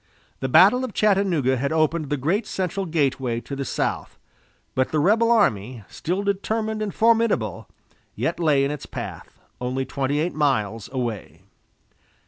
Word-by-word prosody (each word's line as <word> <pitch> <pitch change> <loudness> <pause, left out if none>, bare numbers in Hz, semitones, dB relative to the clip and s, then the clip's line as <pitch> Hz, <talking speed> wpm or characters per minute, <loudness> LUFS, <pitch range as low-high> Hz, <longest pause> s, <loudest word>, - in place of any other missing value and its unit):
The 130 - -2
battle 205 - +6
of 255 -5 -5
Chattanooga 190 -11 +2
had 140 +3 -1
opened 155 -1 +1
the 145 - 0
great 185 - 0
central 190 +1 -2
gateway 135 -7 0
to 140 - -7
the 135 - -3
south, - - -3 0.6
but 130 0 +1
the 155 - -1
rebel 220 +9 +3
army, 120 - +1
still 185 +5 -3
determined 215 +2 -1
and 210 -2 -2
formidable, 230 +1 +1 0.5
yet - - -2
lay 145 -5 +3
in 140 - -1
its 150 - -6
path, - - -8 0.2
only 130 +2 -2
twenty 140 +2 -1
eight 170 +3 -1
miles 115 -8 0
away. 110 - -4
150 Hz, 150 wpm, -23 LUFS, 130-200 Hz, 0.6 s, battle